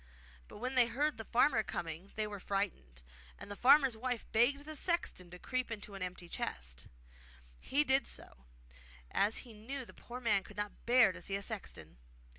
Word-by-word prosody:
But -, -, -11 dB
when 250 Hz, +4 st, -3 dB
they 250 Hz, -2 st, +6 dB
heard 280 Hz, +1 st, 0 dB
the 225 Hz, -, -5 dB
farmer 245 Hz, -1 st, +4 dB
coming 170 Hz, -1 st, -5 dB
they 215 Hz, -, 0 dB
were 205 Hz, -1 st, -6 dB
frightened, 175 Hz, -, -3 dB, 0.3 s
and -, -, -9 dB
the -, -, -4 dB
farmer's 270 Hz, +2 st, +6 dB
wife 245 Hz, 0 st, -3 dB
begged 275 Hz, +6 st, +3 dB
the 310 Hz, 0 st, -5 dB
sexton 300 Hz, -, -1 dB
to 180 Hz, -, -10 dB
creep 255 Hz, +6 st, -2 dB
into 210 Hz, -2 st, -6 dB
a 195 Hz, -, -6 dB
great 185 Hz, -, -1 dB
empty 180 Hz, -1 st, -11 dB
chest. -, -, -5 dB, 0.7 s
He 290 Hz, +2 st, +2 dB
did 270 Hz, -1 st, +4 dB
so, 65 Hz, -, -8 dB, 0.7 s
as 205 Hz, +3 st, +3 dB
he 235 Hz, -, -12 dB
knew 255 Hz, +5 st, -6 dB
the -, -, -13 dB
poor 245 Hz, +1 st, -8 dB
man 215 Hz, -5 st, +3 dB
could -, -, -14 dB
not 205 Hz, +2 st, -5 dB
bear 240 Hz, -4 st, +7 dB
to 180 Hz, -1 st, -10 dB
see 195 Hz, -, -2 dB
a 200 Hz, -, -2 dB
sexton. 190 Hz, -, -6 dB
220 Hz, 195 wpm, -34 LUFS, 195-255 Hz, 0.7 s, bear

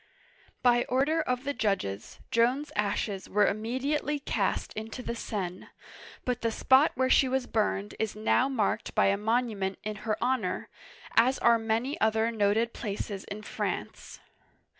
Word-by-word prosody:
'* -, -, -29 dB, 0.2 s
By 240 Hz, -1 st, +5 dB
order 280 Hz, +6 st, +1 dB
of 250 Hz, -4 st, -2 dB
the 285 Hz, +1 st, -2 dB
judges, 195 Hz, -, -2 dB
Joan's 250 Hz, +6 st, +2 dB
ashes 200 Hz, -1 st, -1 dB
were 210 Hz, 0 st, +4 dB
immediately 260 Hz, +8 st, -1 dB
cast 280 Hz, -, -1 dB
into 220 Hz, +3 st, -6 dB
the 235 Hz, -, -3 dB
Seine, 190 Hz, -6 st, -4 dB, 0.6 s
but 250 Hz, -1 st, -1 dB
the 230 Hz, -, +1 dB
spot 265 Hz, +6 st, +4 dB
where 260 Hz, +1 st, +2 dB
she 260 Hz, 0 st, +4 dB
was 260 Hz, -1 st, 0 dB
burned 210 Hz, -3 st, -1 dB
is 220 Hz, -2 st, -1 dB
now 225 Hz, +5 st, +2 dB
marked 225 Hz, -7 st, -1 dB
by -, -, +4 dB
a 200 Hz, -, +3 dB
monument 215 Hz, -3 st, 0 dB
in 215 Hz, 0 st, -4 dB
her 215 Hz, 0 st, -2 dB
honor, 240 Hz, -7 st, -1 dB, 0.5 s
as 255 Hz, +3 st, +4 dB
are 235 Hz, -1 st, +4 dB
many 225 Hz, +5 st, -1 dB
other 220 Hz, +1 st, +2 dB
noted 220 Hz, +1 st, +1 dB
places 205 Hz, -2 st, -5 dB
in 210 Hz, +1 st, -7 dB
France. -, -, -4 dB
230 Hz, 155 wpm, -29 LUFS, 210-255 Hz, 0.6 s, By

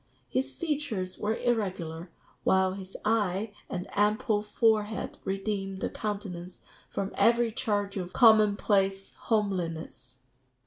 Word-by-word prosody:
His 265 Hz, +2 st, -1 dB
features 285 Hz, -, -3 dB
were 215 Hz, +1 st, 0 dB
irregular, 185 Hz, -8 st, -1 dB, 0.3 s
while 190 Hz, 0 st, +3 dB
his 190 Hz, -1 st, -8 dB
eye 210 Hz, -1 st, +1 dB, 0.2 s
and 180 Hz, 0 st, -4 dB
ample 210 Hz, +1 st, +2 dB
forehead 215 Hz, 0 st, +1 dB
redeemed 195 Hz, 0 st, -2 dB
the -, -, -3 dB
countenance 190 Hz, -4 st, -5 dB, 0.3 s
from 195 Hz, 0 st, -3 dB
every 235 Hz, 0 st, +3 dB
charge 205 Hz, -3 st, -1 dB
of 180 Hz, -1 st, -4 dB
common 215 Hz, -3 st, +6 dB
place 195 Hz, -1 st, +1 dB
homeliness." 165 Hz, -, -2 dB
200 Hz, 115 wpm, -29 LUFS, 185-220 Hz, 0.3 s, common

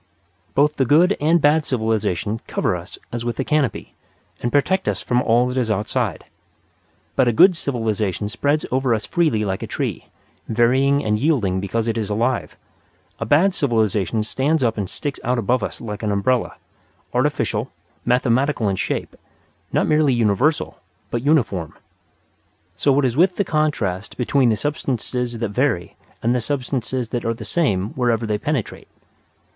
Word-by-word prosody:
Both 150 Hz, +2 st, +3 dB
the 135 Hz, -, +2 dB
good 170 Hz, -, +4 dB
and 165 Hz, +3 st, +4 dB
bad 155 Hz, +1 st, +3 dB
civilization 110 Hz, -, -1 dB
cover -, -, 0 dB
us 90 Hz, +1 st, -8 dB
as 120 Hz, 0 st, -4 dB
with 120 Hz, 0 st, -3 dB
a -, -, +2 dB
canopy, 150 Hz, -2 st, -1 dB, 0.5 s
and 120 Hz, -, -1 dB
protect 190 Hz, +7 st, +2 dB
us -, -, -2 dB
from 125 Hz, -1 st, +1 dB
all 120 Hz, 0 st, +3 dB
that 125 Hz, +1 st, -1 dB
is 120 Hz, -3 st, -1 dB
outside. 105 Hz, 0 st, -1 dB, 0.9 s
But 130 Hz, -, +3 dB
a -, -, +4 dB
good 180 Hz, -, +6 dB
civilization 110 Hz, -, -2 dB
spreads 145 Hz, +8 st, 0 dB
over 130 Hz, -2 st, +2 dB
us 110 Hz, -, -4 dB
freely 155 Hz, -12 st, +1 dB
like 95 Hz, -1 st, -2 dB
a -, -, -4 dB
tree, -, -, -3 dB, 0.4 s
varying 130 Hz, +5 st, +3 dB
and 105 Hz, 0 st, +1 dB
yielding 115 Hz, -, +1 dB
because 110 Hz, +4 st, -2 dB
it 115 Hz, 0 st, 0 dB
is 105 Hz, -2 st, -3 dB
alive. 120 Hz, +4 st, -1 dB, 0.6 s
A 115 Hz, -, -3 dB
bad 170 Hz, -, +4 dB
civilization 110 Hz, -, +1 dB
stands 135 Hz, +6 st, 0 dB
up 115 Hz, -2 st, +1 dB
and 100 Hz, -4 st, -3 dB
sticks 145 Hz, -2 st, -4 dB
out 125 Hz, +1 st, 0 dB
above 120 Hz, +2 st, +1 dB
us -, -, -4 dB
like 105 Hz, -3 st, -6 dB
an 105 Hz, -2 st, -1 dB
umbrella 115 Hz, +5 st, 0 dB, 0.6 s
artificial, -, -, 0 dB, 0.3 s
mathematical 125 Hz, 0 st, +1 dB
in 95 Hz, -, -1 dB
shape; -, -, -3 dB, 0.6 s
not -, -, +2 dB
merely 150 Hz, -4 st, +3 dB
universal, 120 Hz, +7 st, +1 dB, 0.3 s
but 120 Hz, -, -1 dB
uniform. 120 Hz, -, +1 dB, 1.0 s
So 140 Hz, -1 st, +2 dB
it 145 Hz, -, +3 dB
is 125 Hz, -2 st, 0 dB
with 180 Hz, +4 st, +3 dB
the 200 Hz, -, 0 dB
contrast 145 Hz, -, -1 dB
between 130 Hz, 0 st, +2 dB
the 110 Hz, -, +1 dB
substances 125 Hz, -4 st, -2 dB
that 115 Hz, -2 st, -2 dB
vary 105 Hz, -6 st, -1 dB, 0.3 s
and 120 Hz, +2 st, +2 dB
the 125 Hz, -, 0 dB
substances 125 Hz, -1 st, -2 dB
that 120 Hz, 0 st, -3 dB
are 115 Hz, 0 st, -1 dB
the 110 Hz, -1 st, -9 dB
same 105 Hz, -, 0 dB
wherever 120 Hz, -3 st, 0 dB
they 105 Hz, -1 st, -1 dB
penetrate. 145 Hz, -3 st, -3 dB
120 Hz, 165 wpm, -21 LUFS, 110-145 Hz, 1.0 s, good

